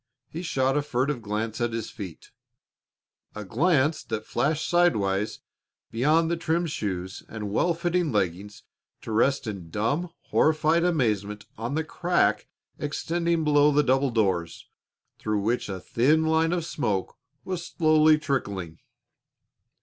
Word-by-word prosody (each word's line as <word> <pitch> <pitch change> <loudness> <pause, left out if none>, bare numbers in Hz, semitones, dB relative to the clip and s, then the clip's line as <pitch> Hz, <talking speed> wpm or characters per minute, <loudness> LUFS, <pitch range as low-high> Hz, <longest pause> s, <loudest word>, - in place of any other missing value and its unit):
He 165 - -5
shot 135 -6 0
a 150 - +2
furtive 135 -1 -1
glance 110 +2 -3
at 120 -1 0
his 115 -1 -4
feet 95 -7 -9 1.0
a 105 -1 -6
glance 150 - +2
that 110 -1 -4
flashed 155 +1 0
sidewise 105 - +1 0.5
beyond 155 +8 +2
the - - +2
trim 165 +1 0
shoes 95 - -4
and 105 -2 -5
well 170 +10 +2
fitting 175 -1 0
leggings 100 0 -2 0.4
to - - -6
rest 130 +6 +2
in 95 -6 -6
dumb, 120 - -1 0.2
horrified 155 +2 +3
amazement 105 - 0
on 120 +5 -4
the 160 - 0
crack 155 - +1 0.3
extending 165 +2 -1
below 150 -1 +4
the 150 +1 +3
double 135 +1 +2
doors, 95 -8 -1 0.5
through 105 -1 -1
which 115 +3 -1
a 95 -1 -4
thin 150 - +2
line 160 +1 +2
of 175 -2 -1
smoke 110 - -2 0.3
was 180 -2 -3
slowly 155 -1 +4
trickling. 100 - -3
130 Hz, 135 wpm, -26 LUFS, 105-160 Hz, 1.0 s, below